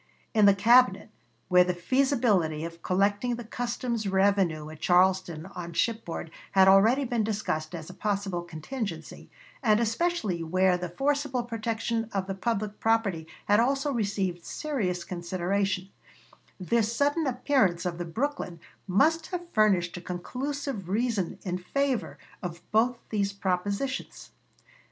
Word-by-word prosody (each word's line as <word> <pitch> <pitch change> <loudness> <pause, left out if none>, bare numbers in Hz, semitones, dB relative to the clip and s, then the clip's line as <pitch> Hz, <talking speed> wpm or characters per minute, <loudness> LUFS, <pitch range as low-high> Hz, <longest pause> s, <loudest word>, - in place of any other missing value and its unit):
In 215 -2 +6
the 200 - +6
Cabinet, 235 0 +4 0.4
where 180 0 +6
the 180 0 -1
feasibility 205 - +1
of 170 0 -9
collecting 205 +7 +1
the 240 - -7
customs 235 -1 -3
revenue 190 -5 +2
at 155 - -11
Charleston 180 -3 +2
on 175 -3 -7
shipboard 215 -6 -2 0.2
had 190 -1 +6
already 220 +8 +6
been 235 -3 0
discussed 180 -7 -2
as 160 -2 -7
a - - -9
possible 200 -4 -2
contingency, 175 - -6 0.3
and 215 -4 +4
especially 230 - 0
where 185 +3 +2
the 180 0 -4
forcible 275 - 0
protection 230 0 -2
of 195 -1 0
the 195 - -3
public 210 0 -2
property 205 -8 +1 0.2
had 205 +1 +4
also 275 +4 +1
received 195 -6 -1
serious 200 - -2
consideration, 185 +2 -2 0.7
this 225 +4 +1
sudden 290 +3 +1
appearance 245 -9 +1
of 175 -1 -3
the 175 - -3
Brooklyn 200 - -3 0.3
must 315 - +3
have 350 -1 -6
furnished 190 -5 +3
a - - -7
conclusive 250 - -4
reason 210 -3 0
in 180 -1 -2
favor 270 +6 -1 0.2
of 170 -3 -6
both 235 +3 +3
these 200 -2 0
propositions. 200 +7 -3
200 Hz, 135 wpm, -28 LUFS, 180-240 Hz, 0.7 s, In